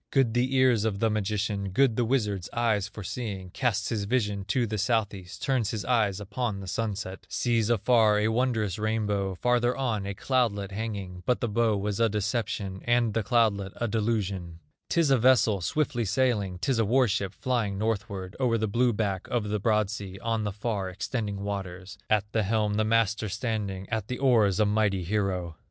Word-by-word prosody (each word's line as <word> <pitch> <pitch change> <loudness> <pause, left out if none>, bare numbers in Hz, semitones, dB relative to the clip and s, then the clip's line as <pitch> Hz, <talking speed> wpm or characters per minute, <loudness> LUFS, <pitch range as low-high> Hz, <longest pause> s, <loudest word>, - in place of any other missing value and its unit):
Good 135 -5 +2
the 125 +2 +1
ears 130 -5 +4
of 110 -3 0
the 110 +2 +1
magician, 105 -1 -1
Good 120 +4 +3
the 120 - +1
wizard's 105 -7 0
eyes 110 -4 +1
for 105 -1 -9
seeing; 95 -3 -5
Casts 110 -4 0
his 105 -4 -1
vision 105 -4 0
to 120 +5 +1
the 110 -1 -3
South 110 -1 +1
east, 90 -2 -9
Turns 125 -6 +1
his 105 -3 -3
eyes 110 -6 +2
upon 105 +1 -3
the 95 - -7
sunset, 95 -1 -4
Sees 115 -3 +1
afar 110 -1 +4
a 105 +1 +2
wondrous 110 -5 0
rainbow, 105 -3 -1
Farther 125 +4 +1
on, 110 -7 -1
a 100 - -4
cloudlet 105 -6 0
hanging; 100 -4 -5
But 125 - +2
the 120 - -1
bow 110 -1 +2
was 100 +1 -2
a 115 -1 +4
deception, 100 -2 -2
And 120 -2 +2
the 115 - +1
cloudlet 105 -4 +1
a 120 - -2
delusion; 100 -6 -2 0.3
'Tis 165 -4 +2
a 135 - +5
vessel 115 -5 +4
swiftly 120 - 0
sailing, 105 -4 +1
'Tis 120 +6 0
a 115 - +3
war 125 +4 +3
ship 100 -2 -2
flying 115 -6 -1
northward, 100 -3 -3
O'er 120 -3 +2
the 110 0 0
blue 120 +3 +2
back 100 -3 -2
of 110 -4 -1
the 105 0 0
broad 105 -1 +1
sea, 100 -3 -6
On 115 -2 0
the 105 - -1
far 105 -2 -3
extending 100 +1 -3
waters, 95 -2 -5
At 105 -2 +3
the 110 - +1
helm 105 0 +1
the 110 +1 +2
master 110 -1 +1
standing, 105 -3 -3
At 110 -3 -2
the 125 - -3
oars 110 -7 +3
a 105 - +4
mighty 105 -3 +1
hero. 90 -4 -1
105 Hz, 190 wpm, -27 LUFS, 100-115 Hz, 0.3 s, a